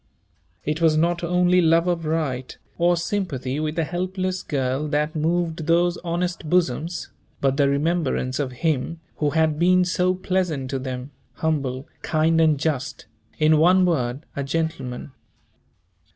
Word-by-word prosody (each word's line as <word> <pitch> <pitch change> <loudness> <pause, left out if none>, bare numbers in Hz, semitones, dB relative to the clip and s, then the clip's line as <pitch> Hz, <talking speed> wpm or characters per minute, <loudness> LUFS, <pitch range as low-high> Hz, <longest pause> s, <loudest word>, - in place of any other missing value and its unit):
It 150 +3 -1
was 160 -2 +4
not 170 +2 +1
only 180 +1 +3
love 165 0 +4
of 175 -2 -1
right, 145 -5 -2 0.2
or 175 +1 +3
sympathy 155 -8 -2
with 155 +1 -2
a 165 - +2
helpless 185 +2 -2
girl, 135 +1 -1
that 150 +2 -1
moved 165 0 -1
those 175 +1 +3
honest 175 -1 -3
bosoms, 170 0 0 0.3
but 135 -1 +1
the 140 -1 +3
remembrance 140 -3 0
of 135 -3 -1
him 160 +2 0 0.2
who 150 - +1
had 155 0 +1
been 180 +1 +4
so 180 +1 +1
pleasant 180 -8 -1
to 135 - -1
them, 130 +1 -5 0.2
humble, 140 -4 -2
kind 160 +1 +2
and 155 -3 +3
just, 145 -2 -2 0.3
in 155 0 +4
one 180 +3 +5
word, 135 -4 -1
a 140 - -2
gentleman. 140 -4 -3
160 Hz, 145 wpm, -23 LUFS, 140-175 Hz, 0.3 s, one